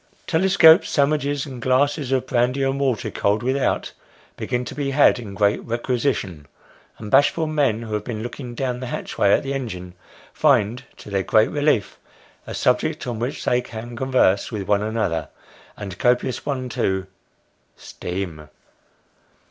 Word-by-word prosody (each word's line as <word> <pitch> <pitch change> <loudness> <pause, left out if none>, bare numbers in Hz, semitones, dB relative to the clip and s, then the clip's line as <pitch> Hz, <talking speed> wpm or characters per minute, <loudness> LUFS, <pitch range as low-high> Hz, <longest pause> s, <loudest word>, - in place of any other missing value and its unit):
Telescopes, 165 0 +5
sandwiches, 145 -1 +1
and 130 -4 -8
glasses 135 +2 +1
of 130 -1 +1
brandy 125 +2 +1
and 135 +1 0
water 125 -5 -1
cold 105 +3 0
with 130 +2 +1
out, 140 - -1 0.4
begin 125 0 -2
to - - -7
be 145 -2 -2
in 120 -7 +3
great 100 0 +1
requisition; 120 - -2 0.5
and 105 -2 -8
bashful 145 +4 +4
men 140 -8 0
who 110 -2 -6
have 105 -1 -1
been 110 -2 -5
looking 120 0 -7
down 125 -1 -2
the 130 - -5
hatchway 100 - -1
at - - +3
the 135 0 -3
engine, 90 -10 -5 0.4
find, 125 -4 +2
to 105 - -11
their 100 -1 +1
great 110 +3 +3
relief, 145 -7 0 0.5
a - - -5
subject - - 0
on 120 -3 -4
which 125 +6 -4
they 125 0 +2
can 120 0 -8
converse 125 -6 +2
with 100 -4 -4
one 105 -1 +2
another 105 -8 -2 0.5
and 100 -3 -6
a - - -10
copious 125 +5 0
one 130 -3 -2
too 95 -5 -1 0.7
Steam. 90 -5 -6
125 Hz, 155 wpm, -22 LUFS, 105-135 Hz, 0.7 s, Telescopes